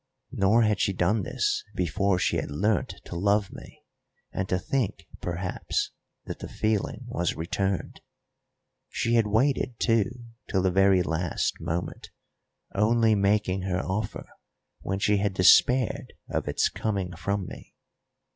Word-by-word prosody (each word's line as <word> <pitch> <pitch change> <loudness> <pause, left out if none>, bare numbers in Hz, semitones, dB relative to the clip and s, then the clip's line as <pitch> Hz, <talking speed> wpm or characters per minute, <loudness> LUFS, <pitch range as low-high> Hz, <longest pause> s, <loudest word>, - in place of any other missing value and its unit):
Nor 105 +4 +3
had 105 -2 +2
she 100 - +1
done 95 +4 +1
this 415 - -1
before 95 +3 +1
she 95 - +1
had - - -3
learnt 100 +7 0
to - - -7
love 100 +2 +1
me, - - -12 0.5
and 95 0 -3
to 90 - +2
think, 130 - -2 0.2
perhaps, 90 +1 -2 0.3
that - - -6
the - - -6
feeling 110 +3 -1
was 90 -8 -1
returned. 95 +3 -2 0.9
She 115 - -1
had 115 -2 +4
waited, 125 +2 +1
too, 115 -4 +2 0.4
till 95 -2 +1
the 95 - +2
very 95 0 +4
last 80 +1 -1
moment, 85 +2 -4 0.6
only 110 +2 +3
making 100 -1 +1
her 90 -1 -1
offer 100 +2 -3 0.5
when 95 - -3
she 100 +1 +2
had 100 -1 0
despaired 110 +7 +4
of - - -2
its - - +2
coming 95 -5 -3
from 100 +3 -2
me. - - -11
100 Hz, 140 wpm, -27 LUFS, 90-110 Hz, 0.9 s, had